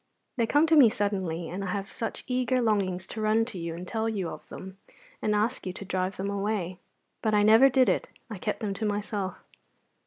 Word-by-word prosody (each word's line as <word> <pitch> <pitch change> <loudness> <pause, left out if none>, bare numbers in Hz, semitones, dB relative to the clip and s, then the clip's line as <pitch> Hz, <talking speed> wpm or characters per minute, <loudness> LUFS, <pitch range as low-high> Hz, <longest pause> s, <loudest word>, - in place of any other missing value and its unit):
They 230 -2 +2
come 290 +6 +4
to 325 0 +4
me 270 -7 +8
suddenly, 190 -6 -2
and 190 +3 -4
I - - -3
have 195 +1 -2
such 225 +2 -5
eager 255 0 +1
longings 195 -6 0
to 220 - -6
run 215 +1 +3
to 225 -6 -7
you 165 -1 -4
and 180 +2 -7
tell 225 0 -1
you 195 -6 -2
of - - -9
them, 190 +1 -9 0.4
and 210 -1 +1
ask 215 +1 0
you 185 - -3
to 200 - -8
drive 185 0 -2
them 200 +1 -2
away. 200 -3 -2 0.4
But 215 -1 +1
I 205 - +4
never 225 +6 +7
did 260 -1 +4
it; 185 - +1 0.2
I 215 -5 -7
kept 210 - -3
them 205 -3 -1
to 215 +3 -3
myself." 205 -2 -2
205 Hz, 220 wpm, -28 LUFS, 190-225 Hz, 0.4 s, me